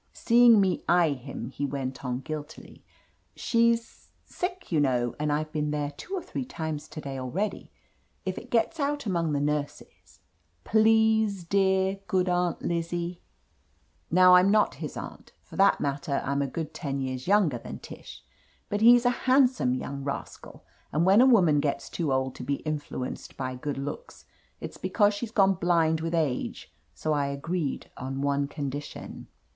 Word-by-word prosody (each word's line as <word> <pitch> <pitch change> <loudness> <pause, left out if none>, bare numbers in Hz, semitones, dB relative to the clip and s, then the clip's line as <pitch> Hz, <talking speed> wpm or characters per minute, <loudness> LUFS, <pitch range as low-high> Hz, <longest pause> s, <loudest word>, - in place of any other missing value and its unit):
Seeing 235 -2 +6
me 190 -3 +1
eye 170 -2 +4
him, 135 0 -6
he 145 - -5
went 135 -2 -4
on 125 0 -3
guiltily: 155 0 -8 0.5
"She's 230 -1 0
— - - -39
sick, 360 - -5
you 160 - +2
know, 125 -4 +1
and 150 0 0
I've 155 +1 -1
been 150 -1 -1
there 150 -1 -2
two 355 - -7
or 365 - -4
three - - -4
times 160 -10 -5
to 155 - -8
day 135 -2 -5
already. 190 +11 -3 0.5
If 185 0 -3
it 245 - -14
gets 240 +8 +1
out 290 -1 -1
among 170 -6 0
the 145 - 0
nurses 145 0 -4 0.2
— 85 +2 -42
please, 220 -2 +3
dear, 190 +1 +1
good 185 -2 +1
Aunt 180 -1 0
Lizzie 170 +1 -3 0.5
!" - - -40
Now, 185 +1 +6
I'm 180 +2 +6
not 210 +1 +3
his - - -5
aunt. - - -9
For - - -14
that 195 +1 +4
matter, 140 0 -1
I'm 140 +1 0
a 140 - 0
good 155 +3 -5
ten 140 -4 -4
years 130 -1 -4
younger 185 - +3
than - - -8
Tish, - - -11 0.5
but 205 +1 -1
he's 240 +2 +7
a 245 - +5 0.2
handsome 255 - +4
young 140 +2 -5
rascal, 140 0 -7 0.3
and 155 +4 +1
when 195 +5 +6
a 260 - +6
woman 175 - +5
gets 145 -1 -2
too 160 -5 -2
old 130 0 0
to - - -7
be 140 +3 -1
influenced 145 -4 -5
by 130 -1 -3
good 140 +3 -4
looks, 145 - -7 0.3
it's - - -7
because 205 -1 +2
she's 210 +3 -4
gone 195 -4 +4
blind 170 -3 +1
with 165 +1 -2
age, 150 -6 -2 0.2
so 155 - -1
I 145 -1 0
agreed 140 +2 -3
on 135 +1 -4
one 140 0 +1
condition. 145 0 -6
160 Hz, 175 wpm, -27 LUFS, 140-200 Hz, 0.5 s, he's